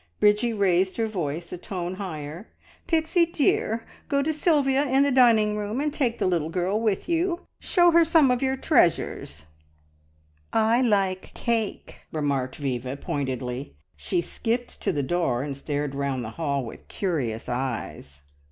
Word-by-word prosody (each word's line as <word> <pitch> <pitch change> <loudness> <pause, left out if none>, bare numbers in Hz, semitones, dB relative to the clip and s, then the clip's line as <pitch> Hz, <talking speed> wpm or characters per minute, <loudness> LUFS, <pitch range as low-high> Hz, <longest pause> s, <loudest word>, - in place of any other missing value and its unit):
Bridgie 210 +3 +3
raised 190 -3 +1
her 225 - +1
voice 170 -6 -4
a 180 - -6
tone 180 -1 -4
higher. 165 -1 -6 0.4
"Pixie 330 +1 +2
dear, 235 -7 +1 0.2
go 280 -1 +2
to 315 +2 0
Sylvia 290 -4 +2
in 270 +1 +4
the 285 - +2
dining 225 -5 +5
room 210 +3 -3
and 295 0 -1
take 250 -6 0
the - - 0
little 170 -4 +1
girl 185 +5 0
with 215 -4 0
you. 345 +1 0 0.2
Show 350 -2 +4
her 335 0 +6
some 320 -5 +4
of 250 - 0
your 265 0 0
treasures!" 160 - +1 1.1
"I 225 +2 +3
like 195 -6 +1
cake!" 225 -3 -2
remarked 140 -4 -1
Viva 130 -2 -3
pointedly. 130 - -4 0.2
She 75 - -1
skipped 235 +7 -3
to - - +1
the 145 -5 -1
door, 135 -5 0
and 140 -1 -4
stared 145 0 -3
round 140 -2 -2
the 110 - -6
hall 140 -2 -2
with 115 - -10
curious 135 - -2
eyes. 120 - -4
190 Hz, 155 wpm, -25 LUFS, -, 1.1 s, her